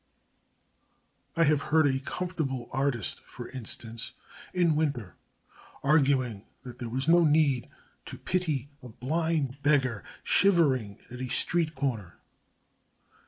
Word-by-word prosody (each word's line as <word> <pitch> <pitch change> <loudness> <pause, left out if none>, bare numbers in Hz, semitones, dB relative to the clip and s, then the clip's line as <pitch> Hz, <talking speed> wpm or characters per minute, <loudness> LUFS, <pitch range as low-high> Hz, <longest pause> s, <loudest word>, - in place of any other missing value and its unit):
I 165 - +5
have 150 -2 +3
heard 155 +1 +3
a 135 -2 +2
comfortable 140 -5 -3
artist, 135 -5 -1
for - - -10
instance, 115 -2 -5 0.4
in 175 -4 +2
winter, 140 - -1 0.7
arguing 135 -7 +2 0.2
that 125 -1 -10
there 120 -2 -4
was 130 +4 -2
no 170 +1 +6
need 150 -5 +3 0.4
to - - -7
pity 155 -7 -1
a 125 - -10
blind 140 +2 -1
beggar 130 -7 +2 0.2
shivering 140 - +3
at 125 +1 -7
a 130 - -2
street 160 +4 0
corner. 120 -10 -3
140 Hz, 120 wpm, -28 LUFS, 125-160 Hz, 0.7 s, no